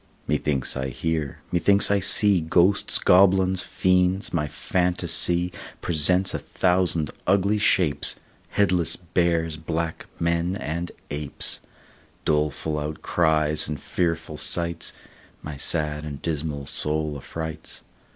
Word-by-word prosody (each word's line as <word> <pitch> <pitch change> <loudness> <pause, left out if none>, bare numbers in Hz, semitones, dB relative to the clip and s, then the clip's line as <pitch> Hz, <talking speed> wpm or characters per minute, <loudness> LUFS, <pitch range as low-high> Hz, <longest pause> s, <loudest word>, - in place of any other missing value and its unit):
Methinks 70 -4 +1
I 65 0 -2
hear, 80 +1 -3
methinks 100 +4 +3
I 100 - +3
see 100 -1 +5
Ghosts, 90 +5 +3
goblins, 95 0 +4
fiends; 90 +2 +1
my 75 -3 0
phantasy 90 +1 0 0.3
Presents 90 +4 +1
a - - -2
thousand 90 -4 +1 0.2
ugly 100 +2 +2
shapes, 90 -7 +1 0.3
Headless 90 -4 +1
bears, 85 -2 0
black 80 +1 -4
men, 85 +2 0
and 85 -2 -4 0.2
apes, 75 -1 -3 0.7
Doleful 75 0 0
outcries, 75 0 0
and 75 -2 -4
fearful 80 -3 -2
sights, 85 0 -2 0.5
My 75 -1 -6
sad 75 0 0
and 75 -3 -6
dismal 75 -2 -3
soul 75 +1 0
affrights. 80 +3 -7
85 Hz, 110 wpm, -24 LUFS, 75-90 Hz, 0.7 s, see